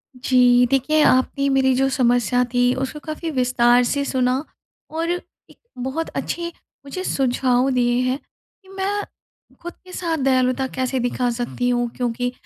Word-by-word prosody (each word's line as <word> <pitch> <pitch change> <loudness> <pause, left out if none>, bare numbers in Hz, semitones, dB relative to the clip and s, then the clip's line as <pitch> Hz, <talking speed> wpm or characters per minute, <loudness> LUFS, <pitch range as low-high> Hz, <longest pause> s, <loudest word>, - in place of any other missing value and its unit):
जी, 250 -1 +4
देखिए 305 +4 +2
आपने 275 +2 +2
मेरी 265 -1 +3
जो 270 +1 +2
समस्या 245 -2 +2
थी 245 0 +3
उसको 300 +3 -8
काफ़ी 315 +2 -4
विस्तार 250 -2 +3
से 280 +3 0
सुना 255 +1 0 0.5
और 330 +2 -2
एक 355 0 -7 0.2
बहुत 265 +6 -3
अच्छे 340 0 -3 0.4
मुझे 370 +7 -5
सुझाव 255 -3 +1
दिए 245 -1 +2
हैं 260 - 0 0.5
कि 380 - -20
मैं 405 +2 -1 0.6
खुद 345 0 -7
के 365 - -13
साथ 330 -2 -2
दयालुता 260 -1 +1
कैसे 260 0 -1
दिखा 245 0 0
सकती 245 +1 -2
हूँ। 240 -1 0
क्योंकि 245 0 -2
255 Hz, 150 wpm, -21 LUFS, 245-285 Hz, 0.6 s, जी